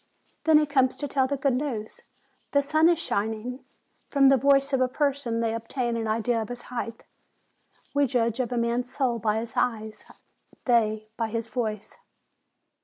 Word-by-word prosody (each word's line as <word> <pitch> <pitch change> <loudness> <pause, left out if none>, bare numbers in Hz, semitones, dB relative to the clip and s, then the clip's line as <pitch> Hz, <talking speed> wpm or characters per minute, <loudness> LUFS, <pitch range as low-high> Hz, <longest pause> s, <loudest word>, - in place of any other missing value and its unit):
Then 320 -1 +6
he 300 - +4
comes 265 -3 +2
to 290 - -4
tell 265 -1 +1
the 280 +1 -2
good 270 0 +1
news, 245 -5 -3 0.5
'The 285 0 +4
sun 310 +3 +4
is 345 - +3
shining!' 220 0 -2 0.4
From 275 -1 +5
the 275 - +6
voice 275 +1 +3
of 265 - +2
a 255 - +4
person 265 -4 -1
they 225 -1 0
obtain 235 +1 -2
an 225 -1 -2
idea 230 +1 0
of 220 - -6
his 245 0 -6
height. 230 -2 -4 0.9
We 285 -1 +3
judge 235 -1 0
of 255 -2 -1
a 245 - -1
man's 235 +1 0
soul 250 -4 0
by 215 0 +1
his 225 0 -4
eyes; 220 -2 -1 0.6
they, 220 -3 +2
by 230 - 0
his 230 +1 -3
voice. 215 -4 -3
245 Hz, 180 wpm, -26 LUFS, 225-275 Hz, 0.9 s, Then